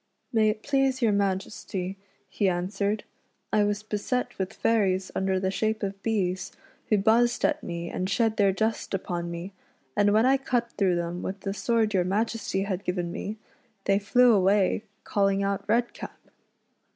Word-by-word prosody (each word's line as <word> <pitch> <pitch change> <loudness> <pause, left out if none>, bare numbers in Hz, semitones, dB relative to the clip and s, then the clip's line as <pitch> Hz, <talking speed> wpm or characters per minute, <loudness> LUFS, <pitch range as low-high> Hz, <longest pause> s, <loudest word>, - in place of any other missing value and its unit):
" - - -44
May 220 -1 +4
it 215 0 -3
please 270 -2 +1
your 225 - +4
Majesty," 195 -1 -2 0.3
he 190 +1 +1
answered, 200 +4 -1 0.3
" - - -38
I 210 - +4
was 205 0 -1
beset 240 +4 -2
with 190 -1 -1
fairies 195 -4 +1
under 190 0 0
the 190 0 0
shape 220 +2 -1
of 195 0 -3
bees, 190 -3 -1 0.4
who 215 - +4
buzzed 230 +4 +3
at 305 0 +1
me 170 0 -5
and 185 +1 -2
shed 225 +1 +1
their 200 -2 +4
dust 220 +1 -1
upon 175 -2 -3
me, 170 +3 -6 0.4
and 205 0 +4
when 220 +3 +4
I 270 +1 +5
cut 245 -3 -1
through 190 -3 +1
them 175 +1 -3
with 195 +1 -5
the 195 - -3
sword 225 0 +1
your 185 -2 +3
Majesty 205 0 -1
had 195 -1 -3
given 180 -2 -2
me, 210 +4 -5 0.5
they 195 0 +3
flew 240 +4 +5
away 200 +1 +3 0.2
calling 195 -1 +1
out 200 0 -1
Redcap." 235 +2 -1
200 Hz, 175 wpm, -27 LUFS, 190-220 Hz, 0.5 s, I